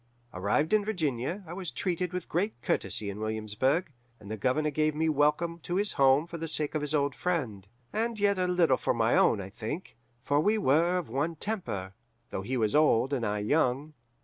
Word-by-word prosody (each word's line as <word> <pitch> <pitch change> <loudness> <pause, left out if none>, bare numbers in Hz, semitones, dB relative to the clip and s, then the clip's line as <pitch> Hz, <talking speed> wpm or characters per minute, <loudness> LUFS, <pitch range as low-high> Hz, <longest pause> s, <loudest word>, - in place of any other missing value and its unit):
Arrived 105 - 0
in 215 -1 +4
Virginia, 170 - -2
I 165 - -8
was 180 -2 -4
treated 180 0 -2
with 180 -2 -4
great 190 - -1
courtesy 100 -2 -1
in 100 - -8
Williamsburg, 110 - -1 0.3
and 105 0 -10
the - - -2
Governor 130 +8 0
gave 155 +1 +1
me 160 +1 +1
welcome 150 +3 +1
to 175 +2 -4
his 205 +1 +2
home 135 +2 +4
for 170 -1 -8
the 165 - -3
sake 150 -1 -1
of 155 - -1
his 150 +1 -1
old 140 -2 +1
friend; 125 - -2 0.3
and 225 +1 -1
yet 200 -1 +2
a 180 - +1
little 175 -7 +3
for - - 0
my 115 0 +2
own, 105 - +4
I 95 0 -7
think, 145 - -6 0.3
for 145 +2 +2
we 210 +7 +3
were 170 0 +3
of 180 - -3
one 145 +8 -1
temper, 150 - -3 0.4
though - - -3
he 125 +6 -2
was 110 0 +1
old 140 -3 +4
and 130 -4 -1
I 105 -1 -1
young. 145 +2 +1
150 Hz, 205 wpm, -29 LUFS, 120-175 Hz, 0.4 s, in